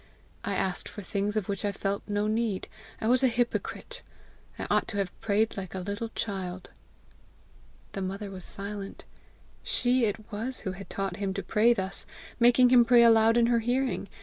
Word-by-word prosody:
I - - -2
asked 185 -2 -2
for 205 - -8
things 205 +2 -1
of 210 - -1
which 200 0 -3
I 205 - +1
felt 200 0 -2
no 205 0 0
need! 215 -2 -1 0.3
I 220 - -2
was 250 +2 +4
a 265 - +5
hypocrite! 245 - -2 0.6
I - - -4
ought - - +2
to 205 - -4
have 195 -3 -3
prayed 215 +1 +1
like 190 -1 -6
a - - -2
little 205 +5 -4
child!" 185 -3 -4 1.2
The 195 - -5
mother 195 +2 -4
was 185 -2 -8
silent: 200 +1 -5 0.6
she 250 0 +2
it 210 0 -4
was 230 +5 -3
who 190 - -3
had 195 +1 -9
taught 195 -3 -3
him 195 -1 -2
to 195 - -3
pray 220 +5 +3
thus 190 -1 -2 0.3
making 245 +1 +6
him 245 -1 +7
pray 235 0 +6
aloud 225 0 +6
in 235 - +5
her 235 0 +3
hearing! 245 -2 -1
210 Hz, 185 wpm, -28 LUFS, 195-235 Hz, 1.2 s, him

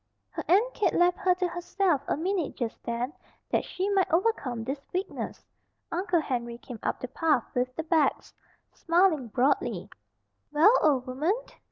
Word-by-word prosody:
Her - - -5
Aunt 430 +8 +4
Kate 420 - +1
left 350 +1 +3
her 370 -2 +3
to 365 0 0
herself 350 -2 0
a - - 0
minute 355 -1 -1
just 235 -3 -4
then 240 +4 -3 0.4
that - - +2
she 375 +2 -3
might 390 -2 +2
overcome 325 - +1
this 270 +4 -4
weakness. 370 +3 -4 0.5
Uncle 350 -1 +1
Henry 240 -4 -3
came 245 -3 -9
up - - -2
the - - -4
path 310 -8 +1
with 250 +1 -1
the 320 - -3
bags, 320 -3 +1 0.4
smiling 335 -6 +2
broadly. 250 +6 0 0.6
"Well, 320 +10 +6
old 275 -5 +3
woman!" 280 +8 0
320 Hz, 160 wpm, -28 LUFS, 255-365 Hz, 0.6 s, Well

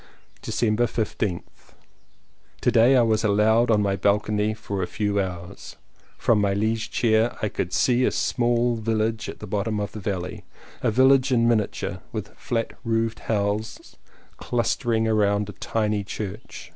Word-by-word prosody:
December 115 +1 +1
15th. 105 -5 -4 0.9
To - - +2
day 120 +4 +5
I 120 - +5
was 110 -1 +1
allowed 110 +3 +3
on 105 -2 +3
my 100 -1 +1
balcony 105 +1 +1
for 100 -3 -4
a 90 - -1
few 105 -1 -1
hours. 90 -2 -7 0.4
From 110 -3 +2
my 100 -1 +1
liege 110 +2 -1
chair 115 0 +1
I 105 - +1
could 90 -2 -3
see 125 +6 +2
a - - +4
small 120 -1 +1
village 110 0 -1
at - - -7
the - - -8
bottom 105 +2 -2
of 105 - -3
the 110 - -7
valley, 95 -3 -4 0.4
a - - +2
village 130 +3 +4
in 115 -2 +3
miniature, 110 -3 -1
with - - -6
flat 115 -1 -3
roofed 115 -1 -1
houses 105 0 -2 0.4
clustering 120 -1 0
round 105 -1 +1
a - - -7
tiny 105 -2 -1
church. 105 +1 -7
110 Hz, 155 wpm, -24 LUFS, 105-115 Hz, 0.9 s, day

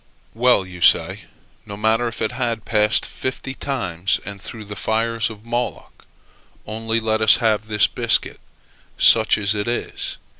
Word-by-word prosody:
"Well," 120 -4 +3
you 90 -1 -11
say, - - +3 0.4
"No 100 -2 -9
matter 110 +3 +1
if 115 - -4
it 110 - -1
had 120 -3 -3
passed 105 0 +2
fifty 130 0 -5
times 95 -11 -2
and 100 -1 -7
through 110 0 -8
the 105 0 -7
fires 115 +2 0
of 110 -1 -12
Moloch; 120 +1 -5 0.6
only 115 +1 -2
let 110 -1 -1
us 110 - +7
have 110 -2 0
this 105 -1 +3
biscuit, - - 0 0.6
such 110 -1 +5
as 100 -1 +1
it 105 0 -3
is." 120 - -4
110 Hz, 155 wpm, -21 LUFS, 105-115 Hz, 0.6 s, us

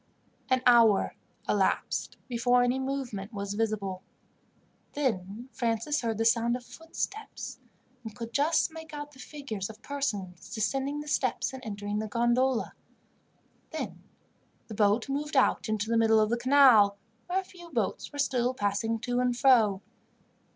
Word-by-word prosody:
An 255 0 +2
hour 230 -4 +5 0.3
elapsed - - 0
before 245 0 +3
any 245 +2 +1
movement 260 -7 -4
was 200 -2 -4
visible. 205 -4 -2 0.9
Then 225 -4 -2
Francis 235 +5 -1
heard 225 -3 -1
the 225 - 0
sound 235 +1 +3
of 245 0 -7
footsteps, 330 - -6 0.4
and 220 -2 -8
could 230 -1 -7
just 310 +4 +2
make 320 -1 -9
out 290 0 -6
the 265 - -18
figures 255 -9 -6
of 220 +2 -12
persons 205 -12 -4
descending 270 +6 -1
the 295 - -10
steps 295 - 0
and 260 -1 -8
entering 205 -1 -3
the 215 - -3
gondola. 240 +3 +1 1.0
Then - - -5 0.7
the - - -6
boat 210 +2 +2
moved 290 +1 -2
out 260 - +3
into 215 0 -1
the 230 0 +1
middle 225 -1 +5
of 215 0 +2
the 235 - +2
canal, 240 -6 +6 0.3
where 360 +2 +1
a - - -4
few 350 -2 -14
boats 230 - -2
were 290 - -9
still 255 -3 +1
passing 215 +2 0
to 245 0 -1
and 250 -1 +1
fro. 220 -7 +4
240 Hz, 150 wpm, -29 LUFS, 215-275 Hz, 1.0 s, canal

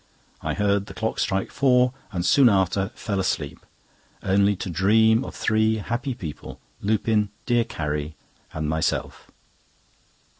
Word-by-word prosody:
I - - -2
heard 100 -1 +1
the - - -10
clock 110 0 -2
strike 95 -1 -1
four, 125 -2 +3 0.2
and 90 -3 -2
soon 135 +3 +6
after 95 0 +1
fell 100 -3 -3
asleep, 95 - -2 0.6
only 100 +1 +3
to 95 - -6
dream 110 +6 +3
of - - -8
three 110 0 +2
happy 120 +5 -3
people—Lupin, 105 +5 -2 0.2
dear 120 -2 +2
Carrie, 75 0 -4 0.4
and 80 -1 -3
myself. 80 +1 -2
100 Hz, 125 wpm, -24 LUFS, 95-110 Hz, 0.6 s, soon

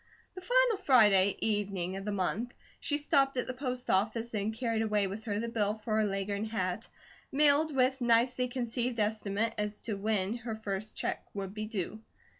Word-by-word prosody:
The 370 - -8
final - - +3
Friday 205 - +5
evening 200 -4 -1
of 195 0 -6
the 210 - -1
month, 200 +5 -1 0.3
she 290 - 0
stopped 275 -2 +2
at 250 - 0
the 255 - -4
post 255 -1 -4
office 225 +5 0
and 210 0 -1
carried 225 -1 -1
away 210 -2 +1
with 200 +3 -6
her 205 -3 -1
the 230 +2 -2
bill 215 -3 0
for 215 0 -2
her 215 - +3
Leghorn 200 +1 -2
hat, 215 -2 -3 0.4
mailed 295 +1 +4
with 260 0 +2
nicely 245 +2 +3
conceived 245 -1 -2
estimate 215 +1 0
as 210 0 -2
to 225 - -3
when 205 +1 0
her 230 -1 -5
first 210 -1 -4
check - - -3
would 195 -1 -4
be 215 0 -4
due. 215 -1 -4
220 Hz, 185 wpm, -31 LUFS, 205-245 Hz, 0.4 s, Friday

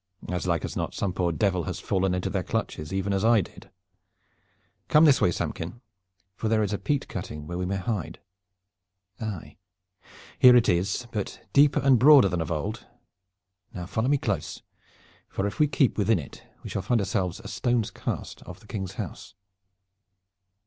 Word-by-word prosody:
"As 90 0 -2
like 85 -2 0
as - - -6
not - - -3
some 95 -3 -1
poor 90 -1 0
devil 90 -1 0
has - - -4
fallen 95 -1 0
into 90 +1 -2
their 95 0 0
clutches, 75 -2 -3
even 95 +1 -1
as 95 +1 0
I 115 -1 +5
did. - - -12 1.2
Come 150 +2 +6
this 145 -3 +5
way, - - +4
Samkin, 85 +4 -4 0.6
for 110 - -2
there 110 -1 +3
is 105 0 -2
a 105 - -2
peat 140 +8 -1
cutting 75 0 -6
where 85 +2 -5
we 90 - -2
may 100 - -1
hide. 90 -5 -3 1.0
Aye, 105 -7 -6 0.8
here 125 -1 +9
it 120 -1 +5
is, 95 +7 +1
but 105 -3 -5
deeper 140 0 +5
and 135 -3 +5
broader 140 -5 +7
than 85 -1 -1
of 80 - -4
old. 75 -3 -3 0.9
Now 90 - -5
follow 110 +6 -1
me 145 +1 +3
close, 100 - -3 0.7
for 95 - -2
if 100 - -4
we 150 - +5
keep 135 -5 +1
within 105 +1 +3
it 70 -5 -9 0.2
we - - -7
shall 100 - -2
find 115 +5 +1
ourselves 95 -2 -1
a - - -10
stone 120 +4 0
cast - - -5
off - - -9
the - - -19
King's 95 -2 -5
house." - - -7
100 Hz, 180 wpm, -26 LUFS, 90-115 Hz, 1.2 s, here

